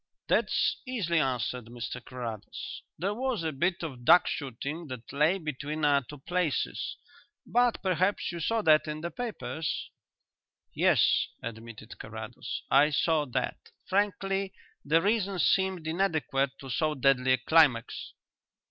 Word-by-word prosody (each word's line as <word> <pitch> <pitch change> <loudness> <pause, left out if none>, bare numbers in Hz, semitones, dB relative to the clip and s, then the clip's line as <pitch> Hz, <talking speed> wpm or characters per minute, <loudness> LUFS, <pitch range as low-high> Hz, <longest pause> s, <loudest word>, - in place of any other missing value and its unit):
That's - - +2
easily 185 -10 0
answered, 125 -3 -1
Mr 120 +1 -6
Carrados. 115 -5 -6 0.2
There 195 +6 -1
was 245 -4 -2
a 160 - -1
bit 170 +5 0
of 130 -7 -6
duck 170 +8 +7
shooting 140 +4 -4
that 130 -1 -8
lay 150 +6 +3
between 155 -2 -3
our 140 -1 +4
two 145 +4 -11
places. 175 +2 -2 0.5
But 245 -1 +2
perhaps 185 +1 +1
you 170 - -5
saw 225 +7 0
that 155 -2 +5
in 150 0 -4
the 170 +1 -4
papers?" 225 - -4 0.8
"Yes," - - +3 0.2
admitted 115 -1 -8
Carrados, - - -6
"I 145 +3 +6
saw 155 +1 +2
that. 125 - -2 0.3
Frankly, 195 -1 0 0.3
the 160 +3 +3
reason 200 -2 +1
seemed 190 -1 +2
inadequate 160 -6 0
to 135 - -8
so 155 +5 +1
deadly 130 -1 +3
a - - +3
climax." 130 -3 +2
155 Hz, 135 wpm, -29 LUFS, 135-185 Hz, 0.8 s, duck